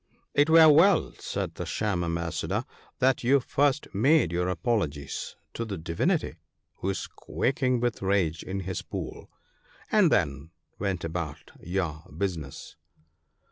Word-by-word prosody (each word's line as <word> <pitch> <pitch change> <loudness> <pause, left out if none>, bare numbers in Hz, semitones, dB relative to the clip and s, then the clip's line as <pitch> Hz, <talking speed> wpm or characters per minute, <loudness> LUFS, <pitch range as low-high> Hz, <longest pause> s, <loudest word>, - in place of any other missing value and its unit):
'It 145 +2 +4
were 160 0 +8
well/ 155 - +5
said - - -3
the - - -5
sham 100 -5 -1
ambassador, 85 -1 -2 0.3
'that 130 -1 +2
you 135 +4 +5
first 140 +2 +1
made 130 - +4
your 90 +1 0
apologies 85 - -2 0.2
to 115 - -3
the 105 -4 -4
Divinity, 80 +1 -1 0.4
who 95 - -2
is 95 - -2
quaking 130 -2 -1
with 120 -1 -1
rage 95 -5 +1
in 95 +1 -4
his 95 -1 -4
pool, - - -7 0.6
and - - +5
then 70 +2 0 0.3
went 95 -3 -2
about 80 -2 -5
your 85 -4 -2 0.2
business.' 85 -8 -4
95 Hz, 135 wpm, -27 LUFS, 85-125 Hz, 0.6 s, were